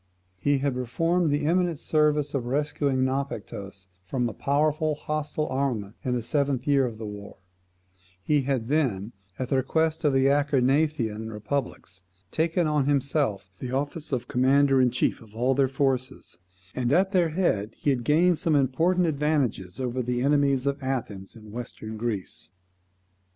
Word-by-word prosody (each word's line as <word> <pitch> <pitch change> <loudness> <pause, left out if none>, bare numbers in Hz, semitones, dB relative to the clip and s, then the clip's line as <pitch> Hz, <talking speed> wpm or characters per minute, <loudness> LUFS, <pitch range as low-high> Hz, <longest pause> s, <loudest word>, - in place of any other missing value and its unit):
He 145 +8 +2
had 140 0 0
performed 165 +8 0
the 145 0 0
eminent 175 -1 +1
service 150 -2 +1
of 125 -4 -2
rescuing 140 -1 0
Naupactus 100 -8 -4 0.2
from 120 +6 -1
a 115 - -5
powerful 150 +4 +1
hostile 150 0 -3
armament 120 -6 -2
in 125 -1 0
the 120 - -2
seventh 140 0 0
year 140 -3 +3
of 115 -2 -7
the 110 - -6
war; 105 -1 -8 0.9
he 150 +6 +2
had 130 -4 -1
then, 120 -8 0 0.3
at 130 -1 -3
the 135 - +2
request 160 +5 0
of 145 -3 +3
the 135 0 +3
Acarnanian 140 -5 +1
republics, 105 -4 -4 0.3
taken 165 +2 +1
on 150 -3 +1
himself 135 - 0
the 125 - -5
office 145 +4 -3
of 125 -2 -2
commander 135 +1 +4
in 125 - +4
chief 125 - 0
of 110 -1 -16
all 125 +3 +2
their 135 0 +3
forces, 130 -7 -2 0.3
and 125 -1 -1
at 190 +5 +3
their 180 -4 +3
head 115 - 0
he 145 - +1
had 125 -3 -1
gained 165 +6 +3
some 160 -2 +1
important 165 +7 +2
advantages 140 - -1
over 130 0 -1
the 125 0 -1
enemies 140 -2 +2
of 140 0 -1
Athens 115 -8 -4
in 110 -2 -13
Western 110 -1 -7
Greece. 110 -4 -4
135 Hz, 160 wpm, -26 LUFS, 120-150 Hz, 0.9 s, commander